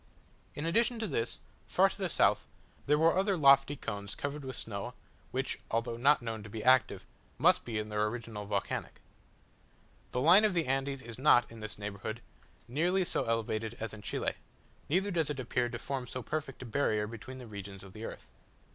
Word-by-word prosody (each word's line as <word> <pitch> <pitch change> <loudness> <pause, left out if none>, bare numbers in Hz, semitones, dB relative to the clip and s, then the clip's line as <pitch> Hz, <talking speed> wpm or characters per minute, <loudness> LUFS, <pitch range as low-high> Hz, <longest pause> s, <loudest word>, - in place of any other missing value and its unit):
In 145 - -3
addition 230 +8 +2
to 225 - -2
this, 115 - -1 0.3
far - - +5
to - - -6
the - - -2
south, - - +3 0.4
there 150 +1 +4
were 165 +2 +4
other 195 0 +2
lofty 140 -1 +6
cones 100 -6 -5
covered 145 +1 -4
with 130 -2 -5
snow, 100 -4 -5 0.3
which, - - -2
although 115 +1 -1
not 135 +2 +4
known 110 -2 -4
to 110 - -10
be 110 +1 -5
active, 130 0 +4 0.3
must - - +5
be 115 -2 -3
in 105 0 -3
their 105 0 +1
origin 115 0 -5
volcanic. 105 -1 -3 1.1
The 125 - -1
line 175 +10 +7
of 210 -4 +3
the 165 -2 +2
Andes 135 0 -1
is 115 +1 -9
not, 125 -4 +5
in 115 - -10
this 110 0 -6
neighbourhood, 105 +2 -5 0.5
nearly 175 +8 +1
so - - -1
elevated 115 0 -1
as 115 -2 -4
in 110 - -9
Chile; - - -1 0.6
neither 190 +6 +2
does 165 -5 +1
it 145 -2 -3
appear 125 0 0
to 120 - -4
form 130 +1 -4
so 130 +1 -5
perfect 145 -1 -4
a - - -8
barrier 110 -3 +1
between 115 +4 -8
the 125 - -9
regions 100 -3 -8
of 95 -1 -12
the 110 +3 -7
earth. - - -8
120 Hz, 195 wpm, -32 LUFS, 110-145 Hz, 1.1 s, line